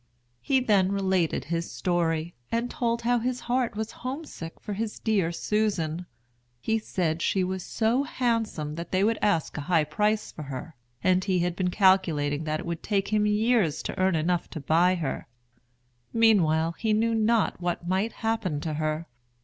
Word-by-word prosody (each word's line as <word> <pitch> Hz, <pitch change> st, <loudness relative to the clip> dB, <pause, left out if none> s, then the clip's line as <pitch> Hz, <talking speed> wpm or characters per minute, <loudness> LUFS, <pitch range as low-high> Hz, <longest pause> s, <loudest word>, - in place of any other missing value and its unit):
He 270 Hz, -1 st, +2 dB
then 200 Hz, -6 st, +3 dB
related 190 Hz, -8 st, +1 dB
his 170 Hz, +2 st, -2 dB
story, 170 Hz, -2 st, 0 dB, 0.2 s
and 235 Hz, +1 st, -1 dB
told 235 Hz, -4 st, -1 dB
how 240 Hz, +1 st, +3 dB
his 250 Hz, +2 st, -2 dB
heart 245 Hz, -2 st, 0 dB
was 220 Hz, +1 st, -3 dB
homesick 255 Hz, -, -6 dB
for 210 Hz, -, -5 dB
his 215 Hz, +1 st, -3 dB
dear 200 Hz, -7 st, +1 dB
Susan. 175 Hz, -4 st, -1 dB, 0.5 s
He 220 Hz, -, 0 dB
said 170 Hz, -6 st, -1 dB
she 190 Hz, +1 st, +1 dB
was 185 Hz, 0 st, -2 dB
so 230 Hz, +4 st, +1 dB
handsome 230 Hz, -, -1 dB
that 170 Hz, -, -6 dB
they 185 Hz, +1 st, +2 dB
would 225 Hz, +2 st, +2 dB
ask 170 Hz, -8 st, +1 dB
a -, -, -2 dB
high 165 Hz, -3 st, +4 dB
price 210 Hz, +8 st, 0 dB
for -, -, -9 dB
her, 140 Hz, +2 st, -7 dB, 0.3 s
and 185 Hz, 0 st, +3 dB
he 190 Hz, -2 st, +1 dB
had 175 Hz, 0 st, -1 dB
been 180 Hz, -1 st, 0 dB
calculating 165 Hz, -7 st, +2 dB
that 155 Hz, 0 st, -1 dB
it -, -, -8 dB
would 170 Hz, -1 st, -4 dB
take 200 Hz, -2 st, 0 dB
him 210 Hz, 0 st, +2 dB
years 210 Hz, -6 st, +2 dB
to -, -, -5 dB
earn 185 Hz, -1 st, +3 dB
enough 170 Hz, +2 st, 0 dB
to 160 Hz, -, -6 dB
buy 170 Hz, +6 st, +3 dB
her; 155 Hz, -6 st, -3 dB, 0.8 s
meanwhile, 170 Hz, -8 st, +4 dB
he 215 Hz, +5 st, -1 dB
knew 225 Hz, +2 st, +2 dB
not 225 Hz, -3 st, +2 dB
what 175 Hz, 0 st, -2 dB
might 190 Hz, +5 st, +1 dB
happen 200 Hz, -9 st, 0 dB
to 155 Hz, -1 st, -3 dB
her. 155 Hz, +1 st, -1 dB
185 Hz, 175 wpm, -27 LUFS, 165-220 Hz, 0.8 s, high